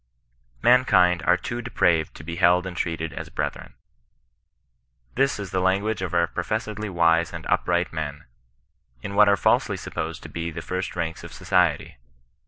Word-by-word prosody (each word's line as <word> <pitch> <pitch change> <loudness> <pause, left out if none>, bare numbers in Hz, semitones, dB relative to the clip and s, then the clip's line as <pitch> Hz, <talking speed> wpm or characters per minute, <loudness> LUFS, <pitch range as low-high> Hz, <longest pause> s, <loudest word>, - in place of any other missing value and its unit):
Man 125 +1 +6
kind 90 -6 +3
are 90 - +5
too 120 +6 -5
depraved 85 -9 +1
to - - -10
be 85 +2 -6
held 90 0 +4
and 95 -2 -6
treated 80 -3 -3
as - - -7
bre - - -2
thren." - - -13 1.4
This 135 +2 +1
is 100 -2 -6
the 95 - 0
language 100 +3 0
of 90 -1 -3
our 85 0 +4
professedly 105 +4 -4
wise 85 -2 +2
and - - -8
upright 90 -1 0
men, 75 -2 -5 0.8
in 100 - -5
what 105 0 +6
are 100 - +4
falsely - - +2
supposed 80 +1 -5
to - - -9
be 85 0 -4
the 85 0 -7
first 90 0 -4
ranks 80 0 -3
of - - -9
society. - - 0
90 Hz, 175 wpm, -24 LUFS, 85-100 Hz, 1.4 s, Man